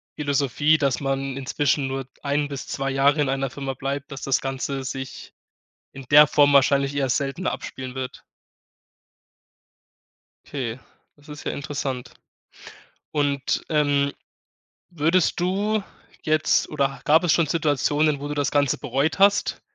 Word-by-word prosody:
Philosophie, 145 +1 +1
dass 140 -3 +1
man 135 -1 -2
inzwischen 140 +1 0
nur 135 -1 -4 0.2
ein 145 +1 0
bis 140 -2 -6
2 135 0 -2
Jahre 140 +2 +3
in 140 - +1
einer 135 -1 -1
Firma 135 0 -4
bleibt, 140 +2 -4
dass 135 - -7
das 135 -2 +1
Ganze 135 0 -3
sich 130 0 -7 0.6
in 135 - -10
der 150 0 +9
Form 145 -1 +4
wahrscheinlich 140 0 +3
erst 135 -3 +1
seltener 140 +6 -2
abspielen 130 0 -7
wird. 130 -1 -6 2.2
Okay, 125 -4 -4 0.4
das 145 0 -17
ist 150 - -9
ja - - -2
interessant. 140 -3 -4 1.0
Und, 140 -2 0
ähm, 145 -2 +2 0.8
würdest 170 +2 +1
du 200 +4 0 0.4
jetzt 155 0 +2
oder 140 -2 -1
gab 160 +4 +4
es 165 - +3
schon 165 -2 +3
Situationen, 150 -1 +1
wo 145 - -5
du 150 - -3
das 145 -1 -1
ganze 145 -3 +2
bereut 145 +5 -1
hast, 200 +1 +3
140 Hz, 140 wpm, -23 LUFS, 135-150 Hz, 2.2 s, der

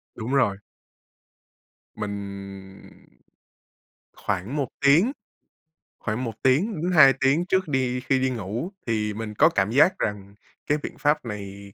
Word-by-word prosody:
Đúng 120 +3 -4
rồi. 120 -8 +2 1.4
Mình 100 -2 -8 1.1
khoảng 100 +8 -3
1 140 -4 -1 0.2
tiếng 165 - +5 0.9
khoảng 110 +3 -3
1 115 - -3
tiếng 155 - +2
đến 180 - 0
2 140 -6 +7
tiếng 145 +6 +3
trước 190 -1 +1
đi 130 -3 0
khi 130 +1 0
đi 130 0 +1
ngủ, 115 - -4 0.2
thì 105 -2 -1
mình 105 0 -6
có 155 +10 +5
cảm 100 - 0
giác 160 +9 +4
rằng 100 -1 -4 0.3
cái 150 - +2
biện - - -6
pháp 150 -2 +1
này 100 -2 -8
125 Hz, 140 wpm, -24 LUFS, 100-145 Hz, 1.4 s, 2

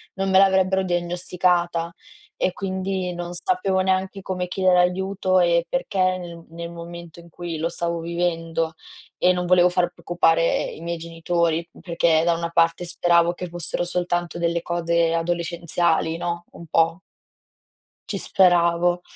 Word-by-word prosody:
non 195 0 -1
me 190 - +6
l'avrebbero 190 0 +3
diagnosticata 175 -1 0 0.4
e 185 - 0
quindi 190 -1 -3
non 175 0 -5
sapevo 185 +2 0
neanche 190 +1 0
come 180 -1 -3
chiedere 185 0 +2
aiuto, 185 +1 +1
ehm, 170 -1 +3
perché 185 -8 0
nel 170 -2 -9
nel 170 +1 -7
momento 170 0 -10
in 170 0 -15
cui 170 0 -6
lo 160 +2 -1
stavo 170 0 -2
vivendo 165 -1 -2 0.4
e 180 - +4
non 180 0 -1
volevo 180 0 +5
far 180 -1 0
preoccupare 165 -1 +1
i - - -8
miei 170 0 -3
genitori, 165 0 -1
perché 170 -2 +2
da 170 - +3
una 170 0 -3
parte 165 +1 +2
speravo 170 0 +2
che 180 +1 -6
fossero 175 0 +1
soltanto 175 -1 -2
delle 170 0 0
cose 170 -1 0
adolescenziali, 170 -1 0
no, 170 0 -3
un 170 - -11
po' 165 +3 +1 1.1
ci - - -3
speravo. 175 -1 +3
175 Hz, 145 wpm, -23 LUFS, 170-180 Hz, 1.1 s, me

